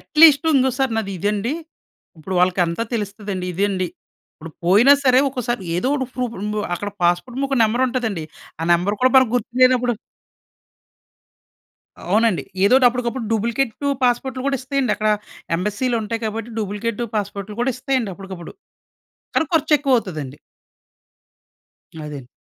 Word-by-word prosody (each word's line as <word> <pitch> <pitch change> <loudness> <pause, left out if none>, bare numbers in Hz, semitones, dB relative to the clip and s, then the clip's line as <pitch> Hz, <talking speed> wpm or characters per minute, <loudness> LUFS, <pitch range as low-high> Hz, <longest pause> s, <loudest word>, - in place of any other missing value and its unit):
At least 310 0 +5
ఇంగోసారి 265 -1 +1
నాదిదండి, 205 - -1 0.7
ఇప్పుడు 185 +4 -5
వాళ్ళకంతా 180 +1 +1
తెలుస్తదండి. 200 -3 -4
ఇదండి 190 0 0 0.5
ఇప్పుడు 165 +1 -10
పోయినా 210 +10 +6
సరే, 255 -1 +5
ఒక్కొసారి 240 -4 -3
ఏదోకటి 260 +8 0
ప్రూఫుంబు 215 -4 -3 0.2
అక్కడ 205 +4 -4
పాస్పోర్ట్‌ముక 250 +11 0
నెంబరుంటదండి, 230 -6 0 0.4
ఆ - - -2
నెంబరు 185 +5 +1
కూడా 255 0 +4
మనకి 260 -3 +5
గుర్తులేనపుడు 250 +1 +3 2.2
అవునండి. 220 -2 +2 0.2
ఏదోటి 255 +5 +5
అప్పుడకప్పుడు 240 0 -3
డూబ్లికేటు 235 +4 -1
పాస్పోర్ట్‌లు 255 +1 0
కూడా 275 - +1
ఇస్తయండి. 265 -3 0
అక్కడ 215 0 +1 0.5
ఎంబసీ‌లుంటాయి 225 +3 -2
కాబట్టి, 225 +1 -4
డూబ్లికేటు 210 +2 -2
పాస్పోర్ట్‌లు 200 0 -4
కూడా 255 +1 +1
ఇస్తాయండి 255 -6 -1
అప్పుడుకప్పుడు. 190 -3 -9 0.8
కానీ 320 - +2
ఖర్చెక్కువవుతదండి. 250 - +1 1.7
అదండి. 145 -4 -8
225 Hz, 105 wpm, -21 LUFS, 195-255 Hz, 2.2 s, పోయినా